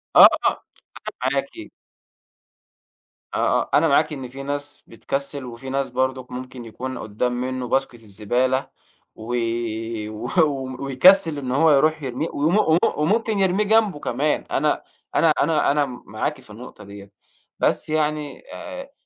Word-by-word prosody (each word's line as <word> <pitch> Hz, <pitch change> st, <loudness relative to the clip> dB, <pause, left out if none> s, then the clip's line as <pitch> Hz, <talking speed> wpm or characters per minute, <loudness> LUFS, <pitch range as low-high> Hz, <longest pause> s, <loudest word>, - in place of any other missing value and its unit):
آه، -, -, +11 dB, 0.2 s
أنا -, -, +2 dB, 0.7 s
معاكِ. -, -, -4 dB, 1.6 s
آه، -, -, -1 dB, 0.2 s
آه -, -, -6 dB
أنا 160 Hz, +2 st, +5 dB
معاكِ 155 Hz, +2 st, +3 dB
إن 135 Hz, -3 st, -6 dB
في 135 Hz, +2 st, -9 dB
ناس 145 Hz, +1 st, -5 dB
بتكسل، 140 Hz, +3 st, -4 dB
وفي 120 Hz, +2 st, -8 dB
ناس 135 Hz, 0 st, -1 dB
برضه 130 Hz, 0 st, -1 dB
ممكن 125 Hz, -1 st, -8 dB
يكون 130 Hz, +3 st, -6 dB
قدام 120 Hz, +4 st, -2 dB
منه 130 Hz, -1 st, -3 dB
باسكت 135 Hz, 0 st, 0 dB
الزبالة 120 Hz, +6 st, -1 dB, 0.5 s
و 115 Hz, +3 st, -5 dB, 0.7 s
و 110 Hz, 0 st, -6 dB, 0.5 s
ويكسل 155 Hz, +4 st, +5 dB
إن 130 Hz, -3 st, -4 dB
هو 160 Hz, +3 st, +4 dB
يرُوح 155 Hz, +2 st, +3 dB
يرميه 130 Hz, +5 st, -3 dB
وم 160 Hz, +8 st, +2 dB
وم 160 Hz, -5 st, +4 dB, 0.2 s
وممكن 215 Hz, +7 st, +1 dB
يرميه 190 Hz, +2 st, +2 dB
جنبه 215 Hz, -6 st, +2 dB
كمان، 145 Hz, +3 st, -1 dB
أنا -, -, +1 dB, 0.3 s
أنا 165 Hz, -, +4 dB
أنا 155 Hz, -1 st, +2 dB
أنا 145 Hz, 0 st, +2 dB
معاكِ 115 Hz, -4 st, -5 dB
في -, -, -20 dB
النقطة 105 Hz, 0 st, -11 dB
ديّة، 100 Hz, 0 st, -12 dB, 0.5 s
بس -, -, 0 dB
يعني 150 Hz, -1 st, -2 dB
آآ 275 Hz, -3 st, -8 dB
135 Hz, 140 wpm, -22 LUFS, 125-155 Hz, 1.6 s, آه